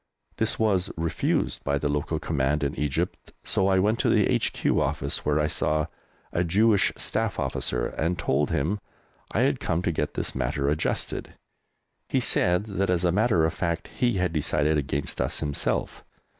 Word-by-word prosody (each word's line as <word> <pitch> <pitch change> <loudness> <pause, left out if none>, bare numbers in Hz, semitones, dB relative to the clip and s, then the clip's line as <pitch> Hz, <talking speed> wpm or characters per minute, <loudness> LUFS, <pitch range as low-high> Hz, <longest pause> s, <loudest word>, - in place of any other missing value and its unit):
This - - 0
was 100 -4 +1
refused 80 -2 -1
by 70 0 +1
the 75 - -1
local 75 +2 -1
command 75 -1 0
in 70 0 0
Egypt, 75 -2 -2
so 95 - +1
I 95 -1 +3
went 105 +5 +2
to - - +2
the - - +4
H.Q. - - +1
Office, - - -1
where 75 +1 +1
I 75 - +2
saw 75 0 +1 0.5
a 85 - +2
Jewish 100 +4 +3
Staff - - -1
Officer, - - -1
and 85 +3 -1
told 70 +2 +1
him 90 +9 0 0.5
I - - +1
had - - +2
come 85 +2 -1
to 85 - +1
get 75 -2 -2
this - - -1
matter 70 +3 -1
adjusted. 75 +2 -2 0.7
He - - +2
said 90 +2 +3
that, 100 -2 -2
as 90 0 +2
a 85 - +3
matter 100 -4 +3
of 80 - 0
fact, 85 -2 -2
he 120 -1 0
had 90 -3 0
decided 75 0 +1
against 70 -1 -2
us - - 0
himself. 75 -2 -1
80 Hz, 175 wpm, -26 LUFS, 75-95 Hz, 0.7 s, the